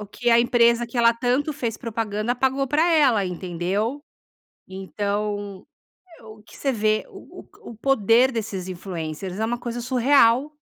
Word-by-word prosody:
O 210 - -7
que 240 +4 -2
a 230 - +6
empresa 235 0 +3
que 235 - -10
ela 235 0 +5
tanto 255 +5 -1
fez 235 -5 -4
propaganda 225 -1 -3
pagou 265 +2 0
pra 310 +6 +2
ela, 260 -10 +3
entendeu. 185 - -3 0.7
Então, 200 +1 -4 0.6
o 220 -1 -14
que - - -17
você 275 - -1
vê 215 -2 0
o - - -12
o - - -15
o 225 - -14
poder 245 0 +3
desses 200 -5 -4
influencers. 180 0 -6
É 220 - -1
uma 240 +2 -2
coisa 240 0 -5
surreal. 260 +2 +3
230 Hz, 155 wpm, -23 LUFS, 205-250 Hz, 0.7 s, a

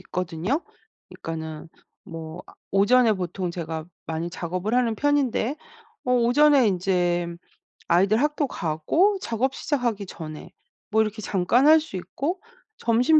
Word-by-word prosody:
있거든요? 180 - -2 0.5
그니까는 160 -1 -7 0.3
뭐 165 +1 -8
아 - - -13 0.2
오전에 225 +4 +5
보통 180 -2 -3
제가 160 -2 -4 0.2
많이 165 +1 -3
작업을 180 +5 -3
하는 235 -3 +2
편인데 280 -3 +1 0.5
어 250 - +1
오전에 250 +2 +5
인제 175 -2 +1 0.6
아이들 195 +6 +3
학교 295 0 +1
가고 260 - +1
작업 260 - -1
시작하기 240 -8 -1
전에 155 -4 -9 0.4
뭐 220 +1 +4
이렇게 215 0 -2
잠깐 200 +8 +2
할 315 +1 +8
수 310 -10 -8
있고 290 - -3 0.4
점심 245 +7 +4
210 Hz, 275 characters per minute, -25 LUFS, 175-255 Hz, 0.6 s, 할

